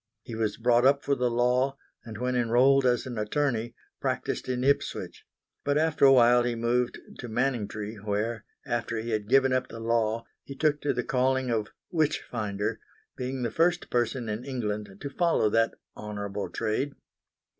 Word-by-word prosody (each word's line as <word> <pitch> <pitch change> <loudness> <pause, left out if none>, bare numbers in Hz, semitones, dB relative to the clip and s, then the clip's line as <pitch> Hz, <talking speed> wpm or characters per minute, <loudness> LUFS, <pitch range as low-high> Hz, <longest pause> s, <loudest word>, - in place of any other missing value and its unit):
He 120 - -8
was 110 -2 -1
brought 120 +1 +3
up 140 +2 +4
for 140 - +1
the 125 -2 +1
law, 125 +3 +1 0.3
and 110 -2 -8
when 125 +2 -1
enrolled 125 +3 +4
as 120 -1 +1
an 120 -4 -5
attorney, 120 0 -1 0.2
practised - - -2
in 125 0 -1
Ipswich; 140 +1 -1 0.4
but 145 0 +1
after 155 -2 +3
a 135 - +8
while 120 -1 +6
he 120 0 -1
moved 120 +1 0 0.2
to 120 - -6
Manningtree 110 -3 -2
where, 105 +2 -2 0.2
after 115 -1 -2
he 115 +1 -3
had 105 -1 -2
given 135 0 +4
up 130 - 0
the 115 - -9
law, 115 0 0 0.2
he 140 - -9
took 150 0 +1
to 145 - +1
the 125 - -1
calling 130 0 +1
of 110 -2 0 0.2
witch 155 -4 +1
finder, 105 -3 -3 0.4
being 130 0 -3
the 115 - -1
first 175 +1 +1
person 120 0 0
in 110 +2 -3
England 105 -6 -3
to 140 - -5
follow 165 -9 +2
that 115 +1 +2 0.2
honourable 105 -1 -5
trade. 130 +7 -1
120 Hz, 175 wpm, -28 LUFS, 110-135 Hz, 0.4 s, a